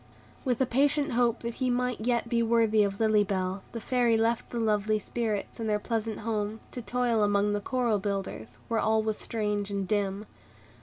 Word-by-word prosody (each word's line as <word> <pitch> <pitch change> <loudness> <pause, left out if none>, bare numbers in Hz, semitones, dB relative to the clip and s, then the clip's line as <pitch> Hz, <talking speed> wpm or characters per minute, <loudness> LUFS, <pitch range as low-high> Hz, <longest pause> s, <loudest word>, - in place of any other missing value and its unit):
With 250 -4 0
a - - +5
patient 285 +4 +2
hope 240 -1 +2
that 235 0 -3
he 255 - +2
might 250 -1 0
yet 235 0 0
be 235 0 +1
worthy 225 -2 +3
of 200 -1 -2
Lily 215 -2 +4
Bell, 190 -1 -2
the 230 - -5
Fairy 240 0 +2
left 225 +1 0
the 235 - -3
lovely 215 -1 +2
spirits 215 0 -3
and 225 -1 -2
their 210 - +2
pleasant 225 0 -3
home, 215 -1 -2
to 245 - -6
toil 240 -1 +1
among 205 0 +2
the 205 - -1
coral 235 -2 0
builders, 190 - -4
where 230 -1 0
all 220 0 +2
was 215 -1 -2
strange 210 -2 -2
and 200 -2 -2
dim. 200 0 -1
220 Hz, 195 wpm, -28 LUFS, 205-235 Hz, -, a